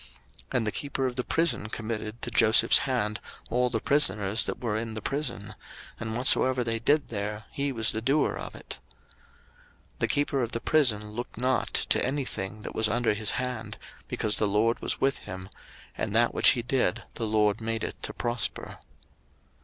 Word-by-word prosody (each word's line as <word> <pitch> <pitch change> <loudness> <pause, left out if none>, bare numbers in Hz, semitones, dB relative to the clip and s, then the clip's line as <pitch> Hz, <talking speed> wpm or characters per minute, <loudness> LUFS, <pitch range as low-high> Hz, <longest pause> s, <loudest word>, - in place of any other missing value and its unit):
01:039:022 - - -16 0.5
And 115 - 0
the 105 - 0
keeper 135 +1 -3
of 125 -1 -2
the 125 - -1
prison 140 -10 +1
committed 110 0 -5
to 120 - -3
Joseph's 110 +1 +5
hand 105 -5 -1 0.3
all 125 0 +2
the 115 -2 -1
prisoners 110 -7 +3
that - - -4
were 115 -4 -2
in 110 0 -3
the - - -3
prison; 130 -7 -3 0.5
and 110 0 -3
whatsoever 130 0 +4
they 115 -1 -1
did 145 +6 +2
there, 105 0 -4
he 140 0 -1
was 110 -4 +1
the 110 - -3
doer 140 +5 +2
of - - -7
it. - - -9 1.2
01:039:023 - - -31
The - - +1
keeper 145 -1 0
of 120 -1 -2
the 115 - -1
prison 110 -8 +1
looked 120 +1 -6
not 130 +2 0
to - - +2
any 135 +2 -1
thing 105 -1 -5
that - - -6
was 110 -1 +2
under 120 0 +1
his 105 0 +1
hand; 125 -3 -4 0.3
because 105 -1 0
the 105 - +2
LORD 110 +3 +2
was - - -2
with 135 0 +1
him, 95 0 -8 0.5
and 105 - -3
that 120 +1 +3
which - - +6
he 120 - -3
did, 125 -7 0
the 115 - -3
LORD 105 0 +2
made 115 0 -2
it - - -5
to - - -1
prosper. 120 0 -1
115 Hz, 190 wpm, -27 LUFS, 110-130 Hz, 1.2 s, which